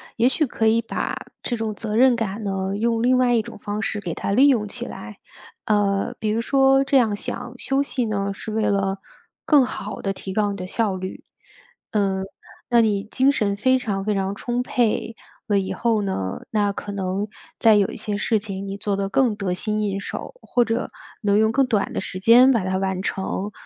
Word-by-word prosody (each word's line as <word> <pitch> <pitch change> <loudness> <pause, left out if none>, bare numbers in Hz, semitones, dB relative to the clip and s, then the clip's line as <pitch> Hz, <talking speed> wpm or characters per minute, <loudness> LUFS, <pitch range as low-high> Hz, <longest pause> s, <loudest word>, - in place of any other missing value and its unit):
也 235 +2 +3
许 295 +3 +2
可 225 -2 -1
以 225 +1 +4
把 230 - -3 0.3
这 240 - -1
种 220 -2 -3
责 215 0 -4
任 250 +1 +5
感 220 -1 -3
呢， 195 0 -2
用 230 +2 0
另 255 +1 +4
外 245 -1 +3
一 225 - +2
种 - - -10
方 205 +1 -4
式 210 - -2
给 175 -4 -4
它 - - -3
利 265 +7 +6
用 235 -7 +2
起 - - -6
来。 105 0 -9 0.5
呃， 200 -2 +1
比 215 - -2
如 220 +2 +1
说 270 +2 +4
这 275 0 +3
样 225 -5 +3
想， - - -5
休 270 +1 +1
息 255 -3 -1
呢， 200 -2 -1
是 215 - -7
为 220 0 0
了 195 -1 0 0.5
更 290 -4 +6
好 215 -4 -5
地 195 - -1
提 190 0 -7
高 205 0 +1
你 200 - -5
的 185 - -5
效 205 0 0
率。 185 0 -6 0.7
呃， 195 -3 0 0.5
那 235 -1 +6
你 205 -3 +1
精 260 +6 +2
神 205 -6 0
非 260 +5 +3
常 200 -5 -2
非 210 +1 0
常 195 0 -1
充 240 +3 -2
沛 230 -2 0 0.3
了 205 -2 +2
以 190 - -3
后 230 -3 +1
呢， 95 - -3
那 205 -2 +2
可 205 - -6
能 195 +1 -2 0.3
再 225 -2 +6
有 200 -2 +4
一 - - -7
些 210 -2 -3
事 220 +1 +1
情 200 -2 -6
你 195 +1 -5
做 205 0 -1
得 195 0 -2
更 235 +1 +2
得 195 -3 -2
心 215 +3 -1
应 200 -1 -1
手， - - -6
或 245 - +1
者 225 +2 -1 0.3
能 205 -1 +2
用 220 0 +3
更 270 +3 +3
短 215 -5 0
的 - - -1
时 185 - -6
间 240 +6 +7
把 230 -6 +1
它 185 0 0
完 190 -1 -1
成。 195 +1 -3
210 Hz, 230 characters per minute, -23 LUFS, 195-235 Hz, 0.7 s, 间